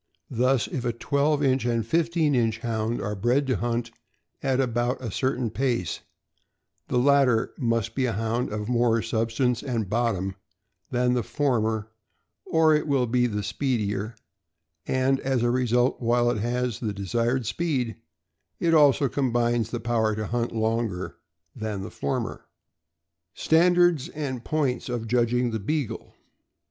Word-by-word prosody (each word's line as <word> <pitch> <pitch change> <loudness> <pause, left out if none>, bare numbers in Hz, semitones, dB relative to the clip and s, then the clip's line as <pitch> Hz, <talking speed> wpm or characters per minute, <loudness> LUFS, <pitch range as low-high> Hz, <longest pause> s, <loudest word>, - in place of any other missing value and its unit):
Thus, 125 0 +2
if 130 - -4
a 120 - 0
twelve 145 +4 +1
inch 130 -2 +2
and 115 -2 0
fifteen 165 +2 +1
inch 115 -3 +1
Hound 115 0 -2
are 105 - -3
bred 120 +7 +1
to 130 -4 0
hunt 120 +1 -2 0.5
at 135 -1 +1
about 120 -1 0
a 120 -4 -5
certain 125 0 -1
pace, 120 - -1 0.9
the 125 - 0
latter 130 -3 +3
must 115 -2 0
be 130 0 0
a 115 - -1
Hound 115 +3 -1
of 105 0 -3
more 120 -2 +2
substance 115 +2 0
and 120 -7 -2
bottom 105 -5 0 0.6
than 125 0 +1
the 125 - +1
former 110 -5 0 0.6
or 160 -1 +4
it 150 +1 +1
will 135 -3 +2
be 125 +1 +2
the 105 -3 -3
speedier; 105 -1 -2 0.7
and, 130 +1 +2
as 130 -3 0
a 120 - +2
result, 125 0 +1
while 120 0 +2
it 110 - -2
has 120 0 -1
the 110 -4 -2
desired 115 +5 -1
speed, 130 -3 -1 0.6
it 165 -1 +2
also 145 -3 +5
combines 120 -3 0
the 120 - -3
power 115 -2 0
to 110 0 -3
hunt 120 +3 -1
longer 110 -4 -2 0.4
than 110 -4 -4
the - - -7
former. 70 - -3 0.9
STANDARD 175 -2 +3
AND 130 -5 -4
POINTS 140 -5 -1
OF 120 -2 -3
JUDGING 120 +1 +1
THE 110 - -2
BEAGLE. 115 0 -3
120 Hz, 150 wpm, -25 LUFS, 115-130 Hz, 0.9 s, also